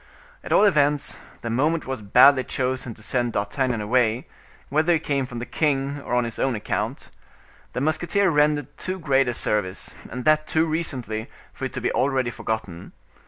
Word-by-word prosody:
At - - -8
all - - +5
events, 150 -7 +2 0.3
the 115 - -3
moment 155 +7 +1
was 130 -3 -4
badly 130 +6 +6
chosen 130 -3 -2
to 110 - -12
send 120 0 0
D'Artagnan 115 +3 -1
away, 115 +2 +1 0.4
whether 155 +4 +3
he 165 - +2
came 140 -4 -1
from 125 - -8
the 120 - -4
king, 140 -1 -1
or 125 - -2
on 125 - +3
his 115 -1 -6
own 135 -3 +1
account. 105 - -3 0.6
The 125 - -2
musketeer 155 +6 +1
had 175 - +3
rendered 150 -2 +1
too 185 0 -3
great 135 -6 +2
a 125 - 0
service, 105 -5 -1 0.2
and 125 0 -6
that 155 0 +3
too 160 +1 +2
recently, 130 -9 -3 0.2
for - - -5
it - - -5
to - - -4
be - - 0
already 130 -3 +1
forgotten. 110 -8 -5
130 Hz, 185 wpm, -24 LUFS, 120-150 Hz, 0.6 s, badly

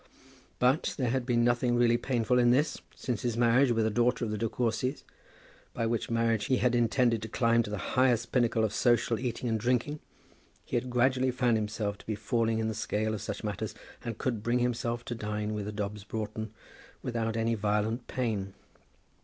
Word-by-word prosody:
But 130 +5 +2
there 125 -5 0
had 130 -1 -1
been 120 -2 +3
nothing 120 0 +2
really 120 -1 +4
painful 125 0 +1
in 120 -1 +5
this. 140 +6 +2
Since 125 -4 -3
his 120 -2 -1
marriage 120 +3 +4
with 115 -1 +2
a 110 - +1
daughter 120 +2 +2
of 110 - -3
the 105 - -2
De 115 - 0
Courcys, 125 +4 -1 0.7
by 115 - 0
which 115 0 -1
marriage 115 -2 +1
he 130 - +2
had 125 0 +2
intended 120 -1 +2
to 110 - -5
climb 115 0 +2
to 110 - -5
the 105 - -3 0.2
highest 125 -3 +2
pinnacle 120 -3 +2
of 110 -1 0
social 120 -1 +2
eating 125 0 -3
and 110 -1 0
drinking, 125 +6 0 0.7
he - - -4
had 120 +1 -1
gradually 130 +1 +2
found 125 -2 +2
himself 105 -1 -2
to - - -15
be 110 - -1
falling 110 +1 0
in 110 0 0
the 110 - -1
scale 110 0 -1
of 105 - -4
such - - -5
matters, - - -3 0.3
and 115 -3 -4
could 120 -5 -2
bring 120 +3 +1
himself 120 -1 -1
to - - -3
dine 105 -1 -3
with 105 -1 -3
a - - -3
Dobbs 105 -1 -4
Broughton 110 0 -4 0.5
without 115 -2 -2
any 115 +1 +1
violent 105 +3 0
pain. 105 -6 -2
115 Hz, 200 wpm, -30 LUFS, 110-125 Hz, 0.7 s, in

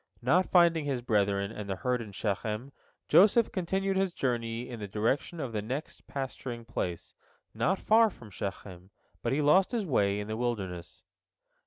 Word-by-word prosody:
Not 175 +9 +3
finding 170 -4 +4
his 130 -4 -2
brethren 100 -3 +1
and 105 -2 -7
the 95 - -1
herd 125 +5 -1
in 110 -3 -8
Shechem, 105 +5 -3 0.4
Joseph 210 +7 +5
continued 190 +1 -1
his 190 -2 +1
journey 120 -2 -2
in 120 -2 -7
the 105 - -5
direction 115 - -1
of 135 -5 -3
the 105 - -1
next 130 +8 -6
pasturing 130 -3 -5
place, 90 -7 -4 0.4
not 190 +4 +1
far 225 +3 +4
from 115 - -14
Shechem, 95 -1 -7 0.3
but - - -1
he 145 +3 +1
lost 185 - +4
his 225 -4 0
way 100 - +1
in 105 - -5
the 110 0 -3
wilderness. 95 -8 -4
120 Hz, 170 wpm, -30 LUFS, 105-165 Hz, 0.4 s, Joseph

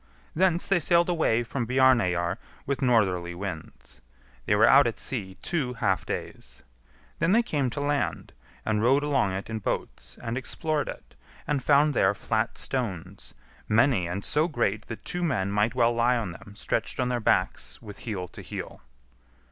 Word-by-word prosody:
Thence 175 0 +2
they 195 -2 +3
sailed 170 +1 +3
away 140 -9 +2
from 120 0 -3
Bjarneyjar 110 -9 +3 0.3
with 140 0 -2
northerly 95 -9 +2
winds. 85 -9 -8 0.5
They 105 - +3
were 110 +2 +5
out 140 0 +7
at 115 - -4
sea 95 -7 -3
two 150 -8 -1
half 95 -8 0
days. - - -6 0.6
Then 165 +4 +2
they 235 +2 +4
came 145 - -1
to 120 - -5
land, 145 0 -1 0.3
and 105 -1 +1
rowed 135 +5 +3
along 140 -10 +1
it 95 +2 -4
in 110 0 -4
boats, - - -4
and 120 +2 -3
explored 155 +2 -2
it, - - -9 0.3
and 145 -2 0
found 145 +2 +4
there 95 -4 +3
flat 110 +3 -1
stones, 115 -11 -4 0.3
many 115 -4 +3
and 90 +3 -4
so 155 +2 +2
great 110 - -1
that 115 - -8
two 180 - -3
men 115 - 0
might 105 +4 +1
well 120 -1 +3
lie 120 +1 +2
on 110 -6 -3
them 100 +4 -12
stretched - - -2
on 125 -1 +1
their 125 -1 0
backs 110 - 0
with 105 -2 -11
heel 100 -6 -4
to - - -10
heel. - - -7
120 Hz, 170 wpm, -27 LUFS, 100-140 Hz, 0.6 s, out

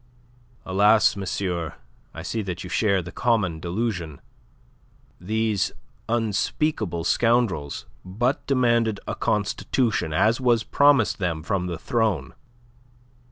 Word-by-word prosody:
"Alas, 105 +4 +4
monsieur, 90 -4 -3 0.4
I 80 - -8
see 110 +4 -2
that 90 -3 -5
you 90 - -8
share 100 -4 +2
the 90 - -8
common 110 -9 0
delusion. 90 -4 -3 1.0
These 110 +1 0 0.4
unspeakable 110 - -1
scoundrels 115 - +1 0.2
but 120 +9 -1
demanded 120 -5 +2
a - - -2
constitution, 105 -2 0
as 110 +10 +2
was 120 -3 +3
promised 140 -8 +3
them 85 -5 -2
from 90 +1 -1
the 85 -2 -4
throne. 105 - -1
105 Hz, 110 wpm, -24 LUFS, 90-115 Hz, 1.0 s, Alas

